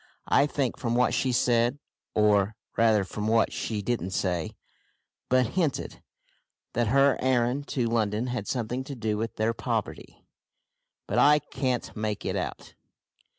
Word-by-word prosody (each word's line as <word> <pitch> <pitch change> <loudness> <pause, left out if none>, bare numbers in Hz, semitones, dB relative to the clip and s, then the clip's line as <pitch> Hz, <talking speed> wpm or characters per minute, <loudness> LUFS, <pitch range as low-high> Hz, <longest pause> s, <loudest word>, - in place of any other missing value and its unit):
I 140 - +4
think 140 -4 -1
from 120 -1 -1
what 125 +1 +3
she 130 - +1
said, 120 +1 +2 0.4
or, 105 -1 +3 0.2
rather 110 -3 +4
from 105 +2 -4
what 115 0 +2
she 105 -3 -3
didn't 95 -5 -2
say, 90 -5 -1 0.7
but 125 -2 +3
hinted, 165 -7 -2 0.7
that 120 0 +1
her 135 +3 +4
errand 130 +2 +1
to 125 -3 -1
London 110 -1 0
had 125 -5 -3
something 125 +1 -2
to 140 - -6
do 110 -3 -1
with 110 +2 -3
their 110 +1 0
poverty, - - -4 0.8
but - - 0
I 150 +1 +6
can't 130 -4 -3
make 105 -1 -3
it - - -1
out. - - -5
120 Hz, 150 wpm, -27 LUFS, 110-130 Hz, 0.8 s, I